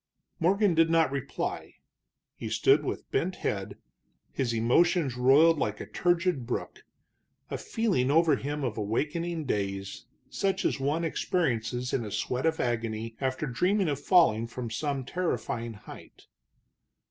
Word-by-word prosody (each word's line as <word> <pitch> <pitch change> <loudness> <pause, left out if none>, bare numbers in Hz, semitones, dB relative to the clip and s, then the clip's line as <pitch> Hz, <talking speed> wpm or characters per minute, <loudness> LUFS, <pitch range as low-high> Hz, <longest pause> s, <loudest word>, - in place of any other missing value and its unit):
Morgan 195 +3 +3
did 165 0 +4
not 165 -3 +3
reply. 140 -2 -4 0.6
He - - -6
stood - - +3
with - - -5
bent - - 0
head, - - -3 0.5
his 130 -3 -1
emotions 135 +6 +2
roiled 145 +6 +5
like 105 -4 -1
a - - -5
turgid 175 -7 0
brook, 125 - -4 0.7
a - - -2
feeling 195 - 0
over 160 0 +4
him 145 +2 -4
of 115 -4 -2
awakening 155 +10 -2
daze, 100 -4 -3 0.2
such 195 -1 -1
as - - +1
one 145 +5 0
experiences 125 -8 -1
in 120 - 0
a 105 - -5
sweat 125 +8 -1
of 160 0 0
agony 115 -1 -2
after 130 +2 -1
dreaming 180 - +1
of 140 -2 -2
falling 145 - +4
from 120 -1 -6
some 140 0 -2
terrifying 120 -8 -2
height. 105 - -13
140 Hz, 140 wpm, -28 LUFS, 120-165 Hz, 0.7 s, roiled